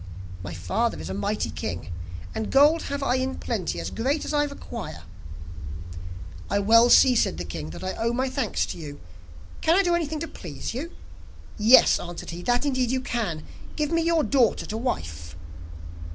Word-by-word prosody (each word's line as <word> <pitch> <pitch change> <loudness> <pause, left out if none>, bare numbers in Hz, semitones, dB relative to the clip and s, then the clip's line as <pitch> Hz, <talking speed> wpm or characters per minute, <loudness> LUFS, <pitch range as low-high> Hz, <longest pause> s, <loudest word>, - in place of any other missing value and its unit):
'My 90 -2 -6
father 85 -3 -1
is 80 +3 -5
a - - -3
mighty 100 -4 -1
king, 85 +3 -5 0.4
and 220 - -3
gold 295 +4 +6
have 280 0 -2
I 260 -1 +2
in 260 +1 -1
plenty 215 -8 -2
as - - -4
great 275 +6 -1
as - - -3
I 295 0 +3
require.' 280 -1 -7 1.5
'I 200 - +1
well 230 +4 +6
see,' 255 +1 +7
said 225 - +2
the - - -4
king, 80 0 -6
'that 80 - -8
I 185 - -2
owe 230 +1 0
my 255 +2 0
thanks 260 -4 -1
to - - -7
you; 145 -3 -8 0.6
can 325 - +4
I 395 - +5
do 350 -2 +2
anything 315 -3 -1
to 330 - -2
please 170 - -6
you?' 290 +8 -4 0.7
'Yes,' 225 +5 +7
answered 175 -1 -7
he, 170 +1 -6
'that 245 +8 +1
indeed 260 -3 +1
you 260 +1 0
can. 210 -11 -2 0.3
Give 300 0 -1
me 330 0 +2
your 330 -1 +2
daughter 255 -6 +2
to 215 - -5
wife. 80 - -3
235 Hz, 185 wpm, -25 LUFS, -, 1.5 s, see